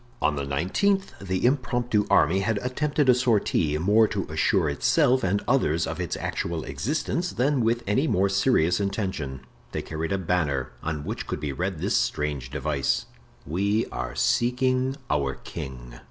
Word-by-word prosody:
On 75 Hz, -, +1 dB
the 70 Hz, -1 st, -3 dB
nineteenth 190 Hz, -, 0 dB
the 95 Hz, +1 st, -1 dB
impromptu 120 Hz, -4 st, +1 dB
army 85 Hz, +6 st, +4 dB
had 110 Hz, +2 st, 0 dB
attempted 145 Hz, +3 st, 0 dB
a 125 Hz, -, +8 dB
sortie, 105 Hz, -, +1 dB
more 105 Hz, +7 st, +4 dB
to 100 Hz, -4 st, -3 dB
assure 80 Hz, +2 st, +2 dB
itself 125 Hz, -, +2 dB
and 95 Hz, +2 st, +1 dB
others 85 Hz, -, +2 dB
of -, -, -5 dB
its -, -, -3 dB
actual 85 Hz, -2 st, -3 dB
existence 150 Hz, -, -2 dB
than 135 Hz, +1 st, +1 dB
with 115 Hz, +1 st, +1 dB
any 130 Hz, +10 st, +1 dB
more 95 Hz, -5 st, +2 dB
serious 95 Hz, -4 st, +2 dB
intention. 95 Hz, -, -3 dB, 0.3 s
They -, -, -2 dB
carried 80 Hz, 0 st, -4 dB
a 95 Hz, -, +1 dB
banner, 75 Hz, -8 st, -1 dB
on 75 Hz, -2 st, -3 dB
which -, -, -5 dB
could -, -, -3 dB
be 75 Hz, -, -3 dB
read 90 Hz, +5 st, -2 dB
this -, -, 0 dB
strange 75 Hz, -4 st, -1 dB
device: 70 Hz, 0 st, -1 dB, 0.4 s
"We 100 Hz, +8 st, 0 dB
are 65 Hz, +2 st, -4 dB
seeking 130 Hz, -, +1 dB
our 70 Hz, -3 st, 0 dB
king." -, -, -8 dB
95 Hz, 160 wpm, -26 LUFS, 75-120 Hz, 0.4 s, a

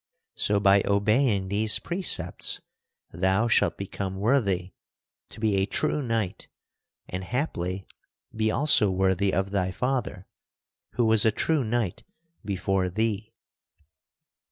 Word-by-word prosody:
So, 100 Hz, 0 st, +1 dB
by 100 Hz, 0 st, +4 dB
obeying 100 Hz, 0 st, +1 dB
these 105 Hz, +2 st, +4 dB
precepts, 170 Hz, -, -1 dB, 0.5 s
thou 95 Hz, +6 st, +1 dB
shalt 115 Hz, -, +2 dB
become 95 Hz, -1 st, -5 dB
worthy 100 Hz, -5 st, 0 dB, 0.6 s
to -, -, -12 dB
be 110 Hz, -3 st, +1 dB
a 95 Hz, +1 st, +1 dB
true 150 Hz, -, -1 dB
knight 115 Hz, -6 st, -3 dB, 0.6 s
and, 90 Hz, +1 st, -5 dB
haply, 95 Hz, -, -3 dB, 0.5 s
be 110 Hz, 0 st, 0 dB
also 125 Hz, -4 st, +5 dB
worthy 95 Hz, +1 st, +1 dB
of 95 Hz, +1 st, -1 dB
thy 95 Hz, -2 st, 0 dB
father, 125 Hz, -3 st, -3 dB, 0.7 s
who 120 Hz, -, +1 dB
was 110 Hz, -1 st, +5 dB
a 110 Hz, -, +4 dB
true 155 Hz, +5 st, 0 dB
knight 110 Hz, -5 st, -2 dB, 0.4 s
before 95 Hz, -2 st, -1 dB
thee." 110 Hz, +2 st, -2 dB
100 Hz, 120 wpm, -26 LUFS, 95-115 Hz, 0.7 s, also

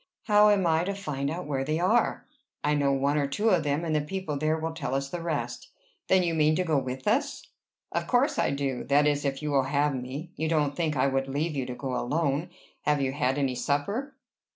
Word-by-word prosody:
"How 210 Hz, -1 st, +5 dB
am 200 Hz, -3 st, +3 dB
I 160 Hz, 0 st, +3 dB
to 200 Hz, +1 st, -2 dB
find 145 Hz, -8 st, -3 dB
out 165 Hz, +2 st, -4 dB
where 135 Hz, -2 st, -1 dB
they 155 Hz, +3 st, -1 dB
are?" 220 Hz, +7 st, +2 dB, 0.4 s
"I 150 Hz, -, +2 dB
know 140 Hz, -1 st, +2 dB
one 140 Hz, +2 st, +1 dB
or 140 Hz, -, +1 dB
two 205 Hz, +11 st, +1 dB
of 180 Hz, -5 st, +4 dB
them, 145 Hz, +3 st, 0 dB
and 160 Hz, -2 st, 0 dB
the 150 Hz, -, +2 dB
people 160 Hz, 0 st, -4 dB
there 155 Hz, +2 st, +1 dB
will 160 Hz, 0 st, -3 dB
tell 145 Hz, -4 st, -3 dB
us 135 Hz, 0 st, -2 dB
the 175 Hz, -, -4 dB
rest." 145 Hz, -8 st, -3 dB, 0.4 s
"Then 190 Hz, -1 st, +4 dB
you 170 Hz, -1 st, 0 dB
mean 155 Hz, -1 st, +3 dB
to 185 Hz, -, +1 dB
go 155 Hz, -5 st, +2 dB
with 130 Hz, 0 st, -5 dB
us?" -, -, 0 dB, 0.5 s
"Of -, -, -2 dB
course -, -, +2 dB
I -, -, +2 dB
do, 140 Hz, -2 st, -2 dB
that 145 Hz, +1 st, +4 dB
is, 145 Hz, -1 st, +1 dB
if 135 Hz, +1 st, -2 dB
you 150 Hz, -, -1 dB
will 135 Hz, -2 st, +3 dB
have 145 Hz, +1 st, +1 dB
me. 135 Hz, +6 st, -6 dB
You 160 Hz, 0 st, -2 dB
don't 150 Hz, -3 st, +1 dB
think 160 Hz, -4 st, -1 dB
I 130 Hz, -, +3 dB
would 135 Hz, 0 st, 0 dB
leave 150 Hz, +4 st, -2 dB
you 130 Hz, -2 st, -2 dB
to 125 Hz, -, -5 dB
go 130 Hz, -1 st, -4 dB
alone? 145 Hz, +4 st, 0 dB, 0.3 s
Have 150 Hz, -1 st, +1 dB
you 135 Hz, -1 st, 0 dB
had 135 Hz, 0 st, 0 dB
any 135 Hz, -3 st, +1 dB
supper?" 200 Hz, -, -2 dB
150 Hz, 240 wpm, -27 LUFS, 140-165 Hz, 0.5 s, How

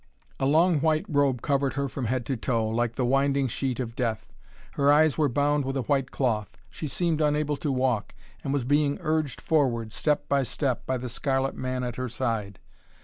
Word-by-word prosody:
A 135 Hz, -, +1 dB
long 160 Hz, +2 st, +4 dB
white 155 Hz, +1 st, +1 dB
robe 140 Hz, -5 st, +1 dB
covered 140 Hz, -2 st, +1 dB
her 140 Hz, 0 st, -1 dB
from 130 Hz, -1 st, -4 dB
head 125 Hz, +1 st, -1 dB
to 135 Hz, -, -1 dB
toe, 115 Hz, -1 st, 0 dB
like 115 Hz, +1 st, -1 dB
the 125 Hz, -, 0 dB
winding 135 Hz, +1 st, +2 dB
sheet 130 Hz, +1 st, -2 dB
of 115 Hz, -2 st, -4 dB
death. 110 Hz, -3 st, -3 dB, 0.4 s
Her 140 Hz, 0 st, +3 dB
eyes 155 Hz, 0 st, +5 dB
were 150 Hz, -3 st, +2 dB
bound 145 Hz, +3 st, +1 dB
with 135 Hz, +1 st, -2 dB
a 130 Hz, -, -1 dB
white 135 Hz, +1 st, 0 dB
cloth. 110 Hz, -7 st, -1 dB
She 155 Hz, -, -5 dB
seemed 160 Hz, +3 st, 0 dB
unable 150 Hz, 0 st, +1 dB
to 150 Hz, -3 st, -2 dB
walk, 130 Hz, -5 st, 0 dB, 0.3 s
and 135 Hz, -, -2 dB
was 140 Hz, -3 st, 0 dB
being 145 Hz, +1 st, +2 dB
urged 155 Hz, -3 st, -1 dB
forward, 120 Hz, -8 st, +1 dB
step 150 Hz, +5 st, 0 dB
by 140 Hz, -1 st, +2 dB
step, 125 Hz, +1 st, -2 dB
by 130 Hz, -, 0 dB
the 125 Hz, +1 st, -5 dB
scarlet 135 Hz, +2 st, -1 dB
man 130 Hz, 0 st, -3 dB
at 120 Hz, -2 st, -4 dB
her 130 Hz, 0 st, -3 dB
side. 115 Hz, -5 st, -2 dB
135 Hz, 205 wpm, -26 LUFS, 120-145 Hz, 0.4 s, eyes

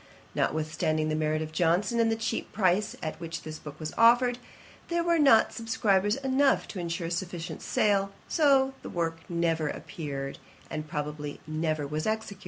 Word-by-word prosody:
Notwithstanding 155 Hz, 0 st, 0 dB
the 155 Hz, -, 0 dB
merit 155 Hz, 0 st, 0 dB
of 155 Hz, -, -7 dB
Johnson, 180 Hz, +8 st, +2 dB
and 225 Hz, -1 st, +3 dB
the -, -, +2 dB
cheap 225 Hz, 0 st, -3 dB
price 195 Hz, +1 st, +1 dB
at 155 Hz, -, -4 dB
which 165 Hz, -1 st, -6 dB
this 155 Hz, 0 st, -7 dB
book 150 Hz, 0 st, -10 dB
was 155 Hz, -1 st, -5 dB
offered, 240 Hz, +1 st, +5 dB, 0.5 s
there 340 Hz, 0 st, 0 dB
were 340 Hz, -1 st, +2 dB
not 275 Hz, -7 st, +6 dB
subscribers 205 Hz, -3 st, +1 dB
enough 270 Hz, 0 st, +2 dB
to 195 Hz, -, -5 dB
insure 170 Hz, 0 st, -3 dB
a 165 Hz, -, -4 dB
sufficient 175 Hz, -1 st, -4 dB
sale; 200 Hz, -1 st, +2 dB, 0.2 s
so 275 Hz, -4 st, +4 dB
the -, -, -7 dB
work 165 Hz, -1 st, -2 dB
never 165 Hz, -2 st, +1 dB
appeared, 145 Hz, -5 st, -5 dB, 0.3 s
and 155 Hz, -1 st, -4 dB
probably, 150 Hz, 0 st, -4 dB
never 155 Hz, -1 st, -1 dB
was 150 Hz, +4 st, -3 dB
executed. 215 Hz, -2 st, -2 dB
170 Hz, 170 wpm, -28 LUFS, 155-225 Hz, 0.5 s, not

